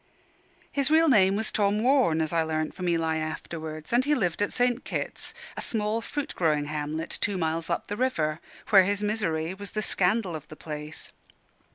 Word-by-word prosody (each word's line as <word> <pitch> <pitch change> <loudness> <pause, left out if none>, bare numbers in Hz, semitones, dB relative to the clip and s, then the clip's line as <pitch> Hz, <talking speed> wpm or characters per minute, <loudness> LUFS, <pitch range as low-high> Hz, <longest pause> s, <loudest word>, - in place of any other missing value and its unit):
His 280 -1 +1
real 320 +1 +5
name 195 -8 +5
was 220 +1 -1
Tom 210 +1 +1
Warne, 250 - +4
as 155 +1 -1
I 165 - +3
learnt 155 -1 -1
from 180 -2 -2
Eli 165 -1 +1
afterwards; 155 +1 -5
and 245 +2 +5
he 295 +2 +2
lived 180 - 0
at 205 - +1
St. 245 0 +1
Kit's, - - -4 0.2
a - - -4
small 215 0 -1
fruit 290 +4 -4
growing 155 -4 +2
hamlet 155 +2 -3
two 205 -2 0
miles 165 0 -1
up 170 - -1
the 205 - -4
river, 160 -11 0 0.3
where 195 -3 +9
his 205 +2 0
misery 185 -6 -1
was 200 +1 -7
the 215 - +1
scandal 190 -1 +1
of 150 -1 -7
the 155 - -10
place. 150 0 -6
180 Hz, 190 wpm, -27 LUFS, 160-215 Hz, 0.3 s, where